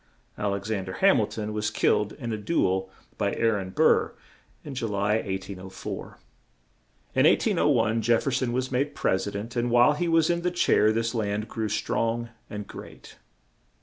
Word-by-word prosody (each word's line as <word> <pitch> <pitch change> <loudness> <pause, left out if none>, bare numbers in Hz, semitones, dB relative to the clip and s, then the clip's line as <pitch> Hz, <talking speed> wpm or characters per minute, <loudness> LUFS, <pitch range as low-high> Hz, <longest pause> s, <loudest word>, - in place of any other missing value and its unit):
Al 100 -1 -1
ex 100 +2 -5
an 100 -3 -1
der 95 - -6
Ham 195 - +4
il 105 - +1
ton 105 -1 -5
was 105 0 -1
killed 105 -1 +1
in 120 -5 -5
a - - -2
du 165 +11 +1
el 95 0 -1 0.3
by 100 -2 0
Aa 115 0 +2
ron 95 -2 -5
Burr - - +3 0.5
in 145 - -7
Ju 125 -3 -2
ly, 105 +1 +1
1804. 95 -2 -6 1.0
In - - +5
1801, 110 +1 +2
Jef 115 +1 +2
fer 140 - 0
son 125 -1 0
was 130 +1 -2
made 135 +3 -1
Pres 95 +2 0
i - - -1
dent; 105 +5 -6
and 120 0 0
while 120 +4 +5
he 170 +4 -1
was 165 0 +3
in 170 0 -1
the 180 - +1
chair 170 -11 +3
this 115 +1 -1
land 105 -1 -2
grew 110 -2 -3
strong 115 +2 -1 0.2
and 105 -1 -6
great. - - -12
110 Hz, 190 wpm, -26 LUFS, 100-125 Hz, 1.0 s, In